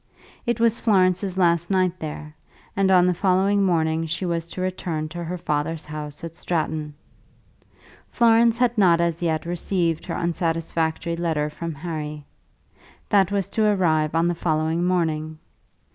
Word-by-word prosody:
It 240 0 0
was 230 0 +2
Florence's 190 -3 +2
last 170 -2 +2
night 185 -2 +1
there, 150 0 -7 0.4
and 195 -1 +2
on 180 -2 +5
the 180 - +3
following 195 +3 +2
morning 165 -3 +1
she 175 +4 -3
was 170 -1 -2
to - - -8
return 175 -4 -3
to 175 +2 -6
her 175 +2 -4
father's 150 0 -2
house 150 0 -7
at 165 -1 -7
Stratton. 155 -3 -3 1.1
Florence 230 -1 +4
had 240 -2 +1
not 175 -4 +5
as 170 -1 0
yet 160 -2 -1
received 170 -1 -1
her 165 - -3
unsatisfactory 165 -1 -1
letter 160 -3 -1
from 165 +1 -5
Harry. 150 -2 -5 0.8
That 195 -2 +3
was 200 -2 0
to 215 -2 +2
arrive 160 -5 +1
on 165 +1 +3
the 175 - +1
following 160 0 0
morning. 160 -3 -1
170 Hz, 150 wpm, -23 LUFS, 160-185 Hz, 1.1 s, on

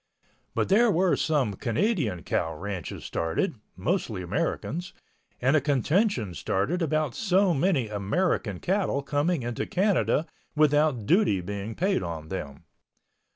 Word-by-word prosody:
But - - 0
there 230 +5 +5
were 185 -1 +3
some 140 -9 +1
Canadian 115 - -1
cow 80 -1 -1
ranches 95 0 -6
started 80 +8 -1 0.2
(mostly 105 - -1
Americans) 165 - -2 0.5
and 135 +4 +3
a 155 - +4
contention 140 - +1
started 100 - -1
about 155 -4 0
so 195 -3 +2
many 145 - +1
American 105 - -1
cattle 185 -7 0
coming 145 +1 0
into 120 0 -3
Canada 170 - +2 0.3
without 150 -5 +3
duty 175 - +3
being 100 +4 -5
paid 190 +3 +1
on 80 -3 -5
them. 75 -7 -6
140 Hz, 125 wpm, -27 LUFS, -, 0.5 s, there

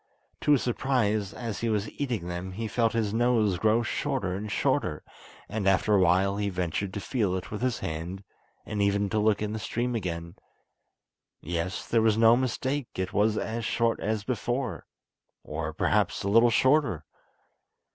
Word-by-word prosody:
To 150 - +3
his 140 - +2
surprise, 115 -5 0
as 115 -4 -5
he 115 - -1
was 105 -1 0
eating 120 -11 -3
them, 90 +1 -5
he 110 +4 -3
felt 115 +1 +1
his 110 -3 0
nose 110 -5 +2
grow 110 +3 +3
shorter 130 -5 -2
and 100 +2 -4
shorter, - - 0 0.4
and 100 0 -2
after 95 +2 +3
a 100 - +5
while 95 +2 +3
he 105 -1 0
ventured 90 +1 -2
to - - -2
feel 100 -3 -1
it 95 - -5
with 105 - -4
his 125 -2 -1
hand, 85 +5 -5 0.4
and 105 -1 -3
even 100 0 +2
to 110 - +1
look 105 0 +2
in 105 0 -2
the 110 - -3
stream 120 +3 -2
again! 85 -6 -4 1.0
Yes, 85 +3 -3
there 115 - +3
was 110 -1 +3
no 115 +1 +6
mistake, 130 +2 -1
it 95 0 -2
was 105 +1 +2
as 115 +1 -3
short 115 +1 +1
as 110 0 -1
before, 120 -2 -3 0.6
or 75 +1 -4
perhaps - - +1
a 100 - -1
little 115 +3 +6
shorter. 130 - +2
105 Hz, 175 wpm, -27 LUFS, 95-115 Hz, 1.0 s, no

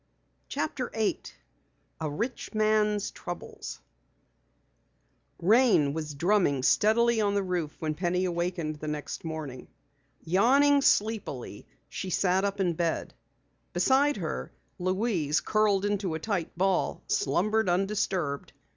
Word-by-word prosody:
CHAPTER 265 -5 -3
8 220 -2 -2 0.6
A 160 -2 -2
RICH 230 - -4
MAN'S 215 -1 +2
TROUBLES 175 -1 -7 1.6
Rain 205 - +4
was 155 -2 -4
drumming 175 -3 +2 0.6
on 205 -1 +1
the 200 - +1
roof 175 -5 -2
when 155 -1 -2
Penny 180 +3 0
awakened 170 -3 -2
the 155 - -7
next 150 -1 -4
morning. 155 -6 -6 0.6
Yawning 275 - +4
sleepily, 205 - 0 0.2
she 190 - -5
sat 185 +1 +2
up 200 0 -1
in 180 -3 +1
bed. 165 0 -2 0.6
Beside 265 +10 +3
her, 165 -5 -4 0.3
Louise, 185 -5 +1
curled 205 -2 +2
into 200 -5 -1
a - - -3
tight 180 -3 -3
ball, 190 0 0
slumbered 210 +9 +1
undisturbed. 185 -5 -1
185 Hz, 110 wpm, -28 LUFS, 160-210 Hz, 1.6 s, Rain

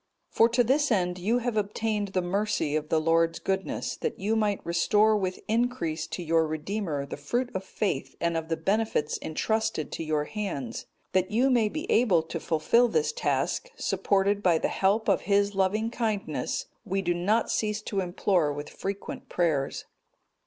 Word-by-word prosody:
'(224) - - -28
For 230 +1 +4
to 245 - +5
this 285 +1 +2
end 180 -3 +1
you 215 +7 +1
have 245 -2 -2
obtained 210 0 -1
the 190 -2 -1
mercy 195 -4 0
of 155 0 -2
the 160 - +3
Lord's 165 +1 +2
goodness, 190 0 -2
that - - -3
you 210 +4 0
might 210 -2 +1
restore 210 +6 +3
with 185 -3 -2
increase 220 -9 0
to 180 - -5
your 165 -1 +2
Redeemer 155 -1 -3
the 140 - -7
fruit 240 - -2
of 190 - -3
faith 190 -7 -2
and 170 0 0
of 165 0 -3
the 165 - 0
benefits 195 -3 0
entrusted 220 0 -1
to - - -4
your 155 -1 0
hands. 150 - -4 0.2
That 185 0 +1
you 250 +5 +3
may 230 -4 +3
be 310 +9 -4
able 195 -9 +4
to 165 +1 -5
fulfil 165 +11 +3
this 460 - +1
task, - - -1
supported 200 +1 +1
by 175 -4 +4
the - - 0
help 205 +3 +1
of 195 - +3
His 200 0 +3
loving 205 +4 +1
kindness 225 - -2 0.2
we 195 -2 -2
do 175 -1 +1
not 205 +6 +1
cease 210 -1 0
to 200 - -2
implore 180 -3 +1
with 145 +1 -6
frequent 200 +1 -6
prayers. 155 -6 0
195 Hz, 180 wpm, -27 LUFS, 165-220 Hz, 0.2 s, to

